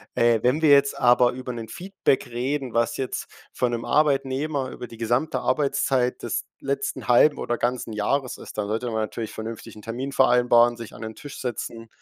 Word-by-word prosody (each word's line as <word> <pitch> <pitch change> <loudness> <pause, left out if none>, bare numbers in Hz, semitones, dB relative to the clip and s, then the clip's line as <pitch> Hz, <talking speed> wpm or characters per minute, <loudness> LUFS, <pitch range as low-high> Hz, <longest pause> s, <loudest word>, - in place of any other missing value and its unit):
Äh, 115 -2 +3
wenn 135 +6 +2
wir 155 - +5
jetzt 140 0 +4
aber 125 -1 +5
über 125 0 -6
'nen 115 -2 -7
Feedback 185 - -1
reden, 125 +2 -3
was 115 0 +1
jetzt 130 - -3 0.3
von 125 -1 0
'nem 115 -1 -3
Arbeitnehmer 140 -1 +1
über 125 - -7
die 115 - -12
gesamte 120 +7 0
Arbeitszeit 135 -3 +1
des - - -2 0.2
letzten 140 0 -3
halben 125 +5 +5
oder 120 - -2
ganzen 120 -2 -2
Jahres 125 +5 -1
ist, - - -11
dann 105 -1 -1
sollte 110 +4 -2
man 115 - -3
natürlich 110 0 -3
vernünftig 110 0 -7
'n 105 - -12
Termin 125 +5 -4
vereinbaren, 120 -2 +4
sich 115 -2 -9
an - - -11
den 110 0 -6
Tisch 145 -1 -9
setzen. 115 -2 -5
125 Hz, 190 wpm, -24 LUFS, 115-135 Hz, 0.3 s, wir